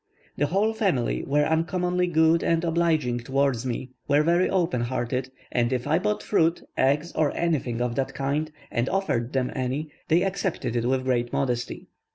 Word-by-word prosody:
The 145 - +1
whole 205 +7 +1
family 190 - 0
were 145 +1 +3
uncommonly 180 +3 +1
good 160 0 +3
and 165 0 +1
obliging 160 -7 +1
towards 130 0 0
me, 125 +1 -4 0.2
were 145 +1 +4
very 170 +3 +3
open 175 -9 +1
hearted, 125 +1 -2 0.2
and 120 0 +1
if 125 -2 -1
I 160 +3 +2
bought 210 +2 -1
fruit, 165 -4 +2
eggs, 145 +5 +1
or 150 -2 +1
anything 135 -8 0
of 125 -1 0
the 135 +1 0
kind, 145 +4 -2 0.2
and 120 +2 0
offered 135 -11 -1
them 130 -2 0
any, 135 +4 -2 0.2
they 170 +3 +3
accepted 190 -10 -2
it 120 -1 0
with 130 0 +1
great 120 -2 0
modesty. 125 -3 -2
145 Hz, 175 wpm, -25 LUFS, 125-170 Hz, 0.2 s, were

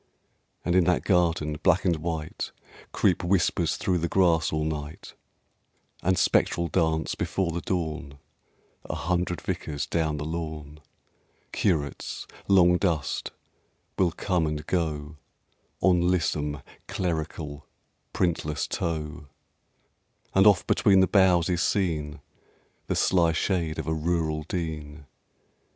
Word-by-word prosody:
And 90 - +1
in 90 -2 +5
that 90 0 +2
garden, 80 -5 +1
black 95 +1 +3
and 85 -3 +2
white, 80 -1 -4 0.4
Creep - - +2
whispers 90 -1 +1
through 90 -2 0
the 85 - -1
grass 85 -4 +3
all 75 0 0
night; 75 -1 -5 0.9
And 95 +1 +2
spectral 85 0 +2
dance, 80 -2 +1
before 95 -3 -1
the 85 +1 -3
dawn, 80 -6 -3 0.7
A - - -4
hundred 90 -1 -1
Vicars 75 -2 -3
down 80 -3 -1
the 75 - -4
lawn; 80 -2 -5 0.7
Curates, 75 -7 -1 0.2
long 90 -3 +5
dust, 85 -8 -1 0.7
will 90 -3 +2
come 90 -2 0
and 75 0 -4
go 75 -3 -2 0.6
On 90 -2 +4
lissom, 75 -5 0 0.2
clerical, 80 -4 -3 0.4
printless 80 -4 -1
toe; 80 -2 -4 1.1
And 95 +2 +6
oft 100 -3 +5
between 95 -2 +4
the - - +6
boughs 90 -4 +4
is 90 -1 0
seen 80 -7 -1 0.7
The - - 0
sly 85 -3 +3
shade 85 -2 -1
of - - -3
a 80 - -1
Rural 80 -1 0
Dean... 75 -4 -4
80 Hz, 120 wpm, -26 LUFS, 75-90 Hz, 1.1 s, And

